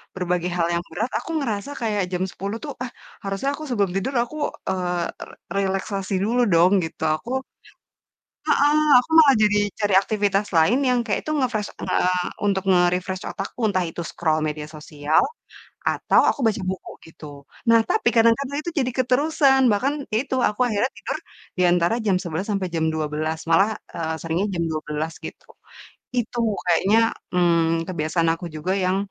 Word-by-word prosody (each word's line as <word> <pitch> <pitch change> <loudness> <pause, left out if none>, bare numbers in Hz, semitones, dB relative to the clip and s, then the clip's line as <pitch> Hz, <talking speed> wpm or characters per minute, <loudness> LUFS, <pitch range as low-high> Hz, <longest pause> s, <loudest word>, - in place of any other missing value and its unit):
berbagai 180 -1 -1
hal 170 -1 +2
yang 170 0 -1
berat, 215 +8 -1
aku 330 - -7
ngerasa 230 0 -3
kayak 210 -4 0
jam 180 +1 -1
10.00 200 +4 -5
tuh, 285 - -5
ah 245 - -6 0.3
harusnya 195 +7 -2
aku 310 - -9
sebelum 200 -6 +1
tidur 230 +8 -1
aku, 275 +6 -9 0.3
eee, 180 -2 -1 0.3
r - - -13 0.3
relaksasi 195 0 -2
dulu 245 +3 +1
dong 175 +3 +5
gitu, 160 0 -6
aku 230 - -9 1.2
Heeh, 290 +1 +4 0.2
aku 250 - -2
malah 285 -4 +8
jadi 210 0 +4 0.2
cari 205 -3 +1
aktivitas 205 -1 0
lain 200 +11 +4
yang 250 -1 +3
kayak 215 - -1
itu - - -2
nge-fresh 235 -6 -1
nge - - 0 0.5
untuk 195 -2 +1
nge-refresh 180 +1 +1
otakku, 195 +5 -6
entah 185 -2 0
itu 170 - -7
scroll 155 -2 0
media 150 0 -5
sosial, 150 -1 0 0.6
atau - - +2
aku 285 - -4
baca 215 -2 +1
buku 190 -1 -7 0.2
gitu. 145 -3 -11 0.3
Nah 230 - +6
tapi - - +2
kadang-kadang 230 +5 +3
itu 345 - -4
jadi 255 -1 0
keterusan, 270 +2 +3
bahkan 255 +8 +1 0.2
ya 220 - +3
itu 265 -1 -3
aku 210 +4 -7
akhirnya 225 +3 0
tidur, - - -4 0.4
di 180 - +3
antara 175 +4 +2
jam 190 -2 +3
11.00 170 +2 -4
sampai 195 -3 -1
jam 160 -1 +1
12.00 155 +1 -2
malah, 195 +6 +5 0.2
eee, 160 -1 -2
seringnya 165 +4 -1
jam 170 - -1
12:00 155 +1 -3
gitu. - - -9 0.7
Itu 240 0 -1 0.3
kayaknya, 190 +5 +3 0.4
mmm, 165 -2 +2
kebiasaan 165 -1 -1
aku 165 +1 -7
juga 155 +5 -2
yang, 185 +1 +1
195 Hz, 165 wpm, -23 LUFS, 170-230 Hz, 1.2 s, malah